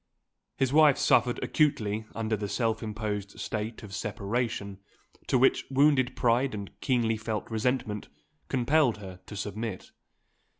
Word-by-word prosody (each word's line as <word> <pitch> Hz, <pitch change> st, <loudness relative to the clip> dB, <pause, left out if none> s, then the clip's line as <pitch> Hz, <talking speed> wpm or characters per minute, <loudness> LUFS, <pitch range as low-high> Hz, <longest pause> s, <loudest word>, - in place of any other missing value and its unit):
His 135 Hz, -1 st, +1 dB
wife 150 Hz, -2 st, +6 dB
suffered 120 Hz, 0 st, +3 dB
acutely 110 Hz, -8 st, +1 dB
under 110 Hz, -1 st, 0 dB
the 105 Hz, -1 st, -4 dB
self 115 Hz, -1 st, 0 dB
imposed 105 Hz, -2 st, -4 dB
state 110 Hz, +1 st, -4 dB
of 100 Hz, -2 st, -9 dB
separation, 100 Hz, -1 st, -3 dB, 0.5 s
to -, -, +3 dB
which 130 Hz, +2 st, +4 dB
wounded 135 Hz, -2 st, +3 dB
pride 120 Hz, +1 st, +2 dB
and 100 Hz, -2 st, -6 dB
keenly 115 Hz, -4 st, +1 dB
felt 110 Hz, -1 st, -4 dB
resentment 110 Hz, -2 st, -1 dB, 0.4 s
compelled 130 Hz, -1 st, +3 dB
her 95 Hz, -3 st, -9 dB
to 105 Hz, -, -8 dB
submit. 105 Hz, 0 st, -5 dB
115 Hz, 130 wpm, -28 LUFS, 105-130 Hz, 0.5 s, wife